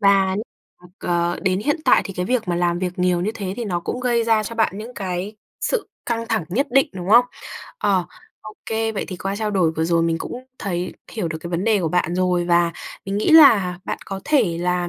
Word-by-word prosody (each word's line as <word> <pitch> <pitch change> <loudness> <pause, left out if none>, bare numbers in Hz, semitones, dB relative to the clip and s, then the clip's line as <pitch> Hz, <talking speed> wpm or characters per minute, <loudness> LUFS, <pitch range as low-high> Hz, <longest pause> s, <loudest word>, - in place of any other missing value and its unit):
và 195 -2 +4
nh - - -2 0.4
ừm, 180 0 -17
ờ, 175 0 0
đến 190 -1 +1
hiện 295 +8 +1
tại - - +5
thì 195 - -6
cái 180 - -2
việc 245 -5 0
mà 175 - 0
làm 175 0 +1
việc 180 -1 -2
nhiều 180 -1 +2
như 195 +4 0
thế 195 -4 -4
thì 240 - -3
nó 180 -5 -2
cũng 245 +8 -4
gây 240 -2 +1
ra 225 -1 +3
cho 230 +2 -6
bạn 220 -3 +1
những 230 +4 -8
cái 190 +1 -4 0.2
sự 485 - -1 0.2
căng 230 -1 -2
thẳng 220 -6 0
nhất 250 - 0
định, 270 +2 +4
đúng 185 -1 -6
không? 240 +3 +8 0.5
Ờ, 190 - +2 0.4
ô 215 - -10
kê, 225 0 -1
vậy 205 - -3
thì 185 - -5
qua 195 +2 -3
trao 215 0 -1
đổi 180 -5 +2
vừa 160 - +1
rồi 170 0 +2
mình 165 0 0
cũng 250 +8 -6
thấy 180 -2 -3 0.2
hiểu 210 -7 -2
được 160 0 -4
cái 170 +2 -8
vấn 175 +2 -1
đề 220 -3 +3
của 165 - 0
bạn 175 0 0
rồi 180 -1 +1
và 170 -1 +3 0.3
mình 195 +1 -3
nghĩ 215 - +1
là 220 - +7
bạn - - -3
có 195 0 -6
thể 215 - +2
là 180 0 0
190 Hz, 245 wpm, -21 LUFS, 175-225 Hz, 0.5 s, không